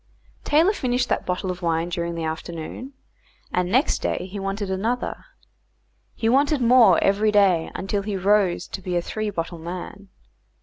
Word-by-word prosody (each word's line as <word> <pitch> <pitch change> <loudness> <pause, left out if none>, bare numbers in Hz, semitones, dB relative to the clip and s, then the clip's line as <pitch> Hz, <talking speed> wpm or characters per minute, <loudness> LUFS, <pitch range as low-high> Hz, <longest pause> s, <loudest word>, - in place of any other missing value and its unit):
Taylor 325 +7 +3
finished 250 -8 -1
that - - -1
bottle 185 +1 -1
of 180 0 -7
wine 165 0 0
during 170 -1 -3
the 165 - -4
afternoon, 165 - -6 0.6
and 180 0 0
next 260 +6 +2
day - - -2
he 195 +2 -7
wanted 195 0 -3
another. 225 +6 -2 0.9
He 225 - -1
wanted 280 +4 +3
more 235 -7 +6
every 205 +2 +3
day, 190 -6 +3
until 200 +1 -2
he 200 -1 -3
rose 190 -2 +2
to 190 - -6
be 180 -1 -2
a - - +1
three 215 +3 -3
bottle 170 -3 -4
man. 185 +4 -7
195 Hz, 165 wpm, -23 LUFS, 175-220 Hz, 0.9 s, more